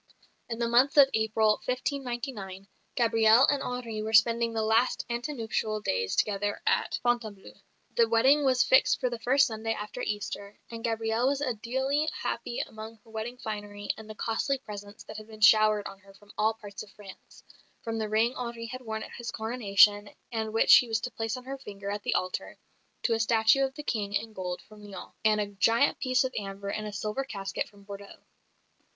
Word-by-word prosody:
In 230 - -3
the 235 0 0
month 250 +5 +3
of 275 -1 +8
April, 220 -1 +2
1599, 245 -7 -4 0.3
Gabrielle 225 +1 +5
and 285 -1 -1
Henri 235 -3 -4
were 220 +1 -4
spending 230 +1 +4
the 225 -1 -1
last 225 +3 +2
ante 240 +5 -2
nuptial 220 -4 -2
days 95 - -1
together 205 0 0
at - - +1
Fontainebleau; 235 -5 -2 0.4
the 230 -1 +4
wedding 265 +6 +4
was 260 -2 +4
fixed 260 - +4
for 250 -2 -1
the 240 - -4
first 270 +4 +4
Sunday 225 -2 -2
after 210 0 -6
Easter, 205 -1 -4
and 230 -1 -7
Gabrielle 225 +1 0
was 275 0 +1
ideally 265 +5 -1
happy 235 +1 -3
among 220 +1 -8
her 225 - -19
wedding 225 +3 -5
finery 205 -3 -5
and 220 0 -12
the 215 - -8
costly 230 +6 -1
presents 205 -4 -10
that 215 - -9
had 215 0 -9
been 220 -1 -12
showered 215 -1 +5
on 195 0 -8
her 195 0 -19
from 205 +1 -18
all 220 +1 +1
parts 205 -2 -9
of 215 - -10
France 200 -3 -14 0.4
from 225 -1 -3
the 215 -1 -2
ring 225 +3 +2
Henri 235 -2 -5
had 255 +3 -7
worn 220 -2 -5
at - - -10
his 240 -1 -7
Coronation 205 -3 +3 0.2
and 220 -2 -2
which 225 - +7
he 245 - +2
was 225 -1 -1
to 250 - -4
place 225 +2 -3
on 250 - -9
her 270 +1 -6
finger 200 -5 -7
at 205 0 -4
the - - -1
altar, 185 0 -3 0.5
to 235 - +2
a 225 - 0
statue 225 +3 +4
of 265 0 -2
the 295 - -7
King 205 -6 -2
in 220 +2 -2
gold 180 -2 -5
from 215 -1 -16
Lyons, 200 -3 -9
and 215 -1 +3
a 210 - +1
"giant 225 +6 +2
piece 255 0 +2
of 260 0 -3
amber 200 -1 -5
in 215 +1 -4
a 210 - -5
silver 215 +5 -3
casket 195 -7 -4
from 200 -1 -19
Bordeaux." 200 0 -10
220 Hz, 200 wpm, -28 LUFS, 210-240 Hz, 0.5 s, of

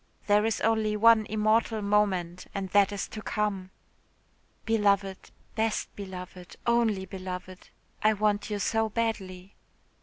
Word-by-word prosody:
There 210 +1 +3
is 225 - -1
only 220 -1 +1
one 225 0 +5
immortal 215 0 +1
moment 190 -4 0
and 195 -1 -3
that 200 +1 +4
is 205 - -3
to 215 - -7
come. 205 -4 -2 1.0
"Beloved, 200 -3 +1 0.2
best 220 0 -1
beloved, 185 -2 -9
only 230 -5 +2
beloved, 185 -1 -8 0.3
I 215 +1 +4
want 210 0 0
you 210 - -2
so 225 +2 0
badly. 195 -4 -3
205 Hz, 125 wpm, -28 LUFS, 190-220 Hz, 1.0 s, one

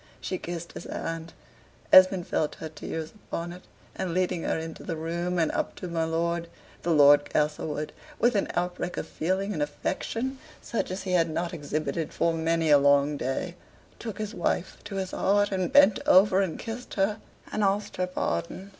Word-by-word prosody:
She 185 - -3
kissed 170 0 -6
his - - -9
hand, 165 0 -5 0.6
Esmond 185 -1 +8
felt 150 - -1
her 160 - -7
tears 160 0 -6
upon 175 -4 -6
it: 180 - -11 0.3
and 175 -2 -3
leading 180 -2 +1
her - - 0
into 160 0 -6
the 165 - -3
room, 170 +3 -2
and 165 -2 +2
up - - -2
to 180 - -6
my 165 -1 -1
lord, 170 +1 -1 0.3
the 175 - -3
Lord 145 -2 +6
Castlewood, 150 0 -1 0.2
with 240 +2 +3
an 200 - +1
outbreak 180 0 -2
of - - -2
feeling 190 +5 -1
and 155 - -3
affection 225 - -2 0.2
such 230 - -3
as 185 +1 -4
he 185 - -3
had 170 -2 +3
not 170 +2 -2
exhibited 155 +1 -3
for 165 - +1
many 165 -1 +1
a 145 - +8
long 140 +1 +4
day, 135 +6 -2 0.5
took 225 -4 -6
his 215 0 -4
wife 175 -1 -1
to 205 -1 -6
his 190 -1 -2
heart, 205 +1 +2
and 185 -2 -1
bent 285 -7 +6
over 190 +1 +6
and 185 -5 -1
kissed 230 +2 -7
her 205 +2 +1 0.3
and 215 - 0
asked 200 +1 0
her 180 0 0
pardon. 135 - -3
175 Hz, 185 wpm, -27 LUFS, 160-195 Hz, 0.6 s, Esmond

